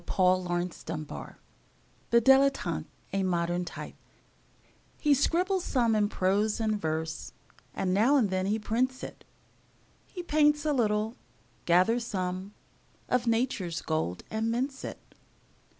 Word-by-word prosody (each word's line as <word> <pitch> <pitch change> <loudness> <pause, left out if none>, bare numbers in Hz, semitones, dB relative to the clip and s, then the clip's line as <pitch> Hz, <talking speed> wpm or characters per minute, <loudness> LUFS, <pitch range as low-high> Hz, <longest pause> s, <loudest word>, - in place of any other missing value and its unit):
Paul 185 -1 +3
Laurence 175 0 -2
Dunbar 155 -2 -7 0.7
The 235 - +6
Dilettante: 270 +3 +3 0.3
A 195 - +1
Modern 175 -1 0
Type - - -7 1.1
HE 295 -2 +4
scribbles 360 +7 +1
some 235 -4 +2
in 205 -1 +2
prose 205 +4 +1
and 215 -2 0
verse, 160 0 -3 0.4
And 185 -1 0
now 230 +9 +4
and 215 -8 +2
then 185 0 0
he 210 +2 +1
prints 250 +4 -1
it; - - -8 0.8
He 360 - -7
paints 295 -2 +3
a 300 - +2
little, 220 -2 0 0.5
gathers 185 +8 +3
some 185 0 -3 0.5
Of 250 -1 +1
Nature's 225 -8 0
gold 155 - -2
and 220 +1 -1
mints 265 +4 -2
it. - - -5
215 Hz, 130 wpm, -29 LUFS, 185-255 Hz, 1.1 s, The